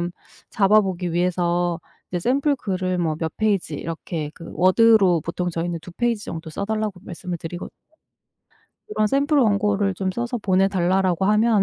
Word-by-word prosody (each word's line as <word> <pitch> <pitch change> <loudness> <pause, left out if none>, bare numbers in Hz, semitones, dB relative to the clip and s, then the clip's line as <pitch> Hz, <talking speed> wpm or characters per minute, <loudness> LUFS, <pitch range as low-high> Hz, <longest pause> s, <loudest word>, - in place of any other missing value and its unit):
좀 175 +1 -2 0.4
잡아 210 0 +5
보기 180 -3 -3
위해서 175 -1 0 0.3
이제 175 - -1
샘플 275 - +2
글을 185 -4 -2
뭐 160 -3 0
몇 160 -2 -3
페이지 200 -8 0
이렇게 160 0 -5
그 165 - -10
워드로 190 -1 +5
보통 175 +1 -3
저희는 170 0 -3
2 - - -10
페이지 235 -1 -1
정도 160 -1 -6
써 200 - -4
달라고 215 -3 -2
말씀을 175 0 -5
드리거든요. 175 +2 -6 1.2
"그런 215 - +1
샘플 285 +5 +2
원고를 205 -4 +2
좀 190 +1 -2
써서 240 +4 -3
보내달라."라고 190 -2 +2
하면 215 0 +4
185 Hz, 340 characters per minute, -22 LUFS, 175-215 Hz, 1.2 s, 잡아